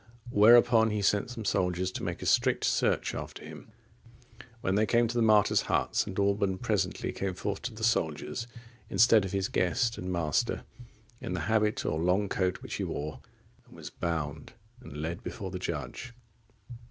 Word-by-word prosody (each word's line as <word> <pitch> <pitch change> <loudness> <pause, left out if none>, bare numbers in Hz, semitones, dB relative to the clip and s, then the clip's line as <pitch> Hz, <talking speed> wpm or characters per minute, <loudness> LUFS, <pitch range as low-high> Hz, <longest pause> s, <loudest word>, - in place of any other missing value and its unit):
Whereupon 115 +1 +6
he 105 -1 -2
sent 105 +3 +2
some 115 -3 -7
soldiers 90 -1 0
to - - -6
make - - -4
a - - -5
strict - - +2
search - - +1
after - - -7
him. 75 +6 -11 0.9
When 95 - 0
they 105 +2 +2
came 120 +1 +3
to 115 - -4
the 120 - +2
martyr's 110 -2 +4
hut, - - 0
St. 95 - 0
Alban 100 -1 +1
presently - - -1
came 95 -2 -3
forth 100 +2 -4
to 125 -1 -5
the 110 - -8
soldiers, 115 +1 -1 0.4
instead 110 -3 +5
of 95 - -5
his 95 -1 0
guest 115 +6 0
and 90 0 -4
master, 85 -4 0 0.6
in 90 - -4
the 90 - -2
habit 110 +2 +1
or 80 - -1
long 90 +4 +1
coat 90 -1 -1
which - - -5
he - - -2
wore, 75 +1 -4 0.5
and - - -17
was - - -9
bound 80 -3 -4 0.3
and 75 - -10
led 80 +3 -4
before 100 -6 -6
the 90 - -5
judge. 85 - -5
100 Hz, 175 wpm, -29 LUFS, 90-110 Hz, 0.9 s, Whereupon